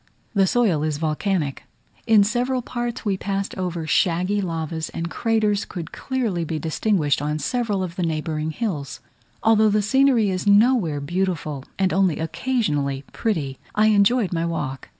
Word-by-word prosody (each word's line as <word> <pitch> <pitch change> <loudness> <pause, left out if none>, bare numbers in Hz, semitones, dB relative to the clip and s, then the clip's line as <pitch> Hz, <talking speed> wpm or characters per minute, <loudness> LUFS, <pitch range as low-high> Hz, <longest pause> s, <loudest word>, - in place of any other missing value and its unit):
The 195 -3 +3
soil 200 -9 +2
is 155 -1 -1
volcanic; 155 -1 -1 0.4
in 220 -3 +6
several 245 +4 0
parts 240 -1 -4
we 200 -2 +1
passed 195 0 -3
over 175 -3 -3
shaggy 180 +5 +1
lavas, 160 -3 -3
and 165 0 -5
craters 215 -3 +1
could 170 -2 -7
clearly 230 -10 -2
be 160 0 -3
distinguished 160 -2 0
on 150 +1 -1
several 205 - -1
of 180 -1 -6
the - - -1
neighbouring 155 -1 -2
hills. 155 - -4 0.4
Although 220 -1 +5
the 210 0 +2
scenery 250 -2 +3
is 185 +2 -3
nowhere 205 - +4
beautiful, 155 -4 -2
and 190 -1 +1
only 190 -4 +2
occasionally 155 - -1
pretty, 155 - -2 0.2
I 215 +1 +4
enjoyed 210 0 +3
my 165 -1 0
walk. 150 -5 -4
185 Hz, 150 wpm, -23 LUFS, 160-215 Hz, 0.4 s, in